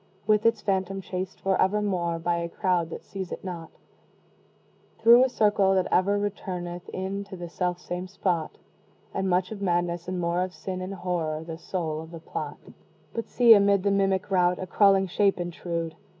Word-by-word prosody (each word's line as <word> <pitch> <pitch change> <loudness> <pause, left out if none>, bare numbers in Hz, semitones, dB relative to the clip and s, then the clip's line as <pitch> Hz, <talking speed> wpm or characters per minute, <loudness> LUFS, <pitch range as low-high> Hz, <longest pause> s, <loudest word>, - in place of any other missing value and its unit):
With 215 +1 +4
its 230 - +2
Phantom 195 -1 -1
chased 185 0 -5
for 190 -1 +1
evermore 190 -4 +1
By 170 +1 0
a 170 0 -3
crowd 180 -3 0
that - - -7
seize 190 -3 -6
it - - -6
not, 175 -3 -6 1.3
Through 235 +3 +7
a 260 - +2
circle 205 -4 +3
that 185 - +2
ever 200 +3 +3
returneth 180 -3 -4
in 195 +2 -3
To 195 -1 -9
the 175 0 -6
self 180 +1 -2
same 180 +1 -5
spot; 180 -4 -2 0.6
And 190 - -1
much 180 +2 +1
of 210 -2 -6
Madness, 175 -2 0
and 185 0 -2
more 170 +1 0
of 185 0 -3
Sin 185 -1 -5
And 190 +2 -5
Horror, 165 -4 -2
the 165 0 -7
soul 160 -4 -3
of 160 - -10
the 165 -1 -9
plot! 155 -2 -5 0.6
But 230 - -4
see, 240 -2 +7
amid 200 -2 +4
the 200 - +2
mimic 195 0 +1
rout, 180 -1 +3
A 185 - -4
crawling 195 +1 +4
shape 195 +1 +1
intrude! 170 -1 -3
185 Hz, 185 wpm, -26 LUFS, 175-195 Hz, 1.3 s, Through